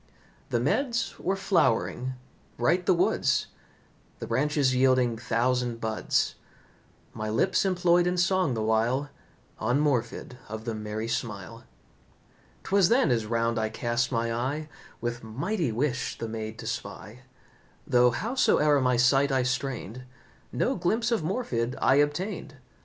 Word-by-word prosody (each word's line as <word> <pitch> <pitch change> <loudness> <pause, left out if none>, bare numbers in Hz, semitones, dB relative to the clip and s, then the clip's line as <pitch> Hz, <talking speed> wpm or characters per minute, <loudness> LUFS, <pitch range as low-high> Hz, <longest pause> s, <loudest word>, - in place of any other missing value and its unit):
The 120 - +1
meads 235 - 0
were 190 - 0
flowering, 130 - +1 0.4
bright 170 +9 +1
the 190 - +6
woods, 170 - +2 0.7
The - - -6
branches 145 -2 +1
yielding 130 -2 +3
thousand 120 +1 0
buds. 110 -4 0 0.8
My 110 0 -4
lips 185 - +2
employed 175 -2 +3
in 180 0 0
song 180 -6 +2
the 110 - -1
while 120 +6 +1 0.5
On 120 +5 +1
Morfydd 130 -1 -1
of 110 +1 -6
the 115 - -2
merry 110 +1 -4
smile. 115 -1 -5 1.0
'Twas 195 -3 +3
then 240 - +3
as 115 -3 0
round 115 0 0
I 110 0 0
cast 120 +2 -1
my 115 -1 0
eye 140 +6 -2 0.3
With 120 0 -3
mighty 145 - -2
wish 130 +3 -1
the 115 - -4
maid 110 0 -5
to - - -9
spy; 110 +5 -6 0.7
Though, 125 0 +4
howsoe'er 150 - +2
my 125 -1 +2
sight 135 +3 +4
I 130 -1 +2
strained, 125 -2 -3 0.5
No 265 - 0
glimpse 225 +7 0
of 230 - +1
Morfydd 140 - -2
I 135 - +4
obtained. 145 +2 -1
125 Hz, 135 wpm, -27 LUFS, 115-160 Hz, 1.0 s, the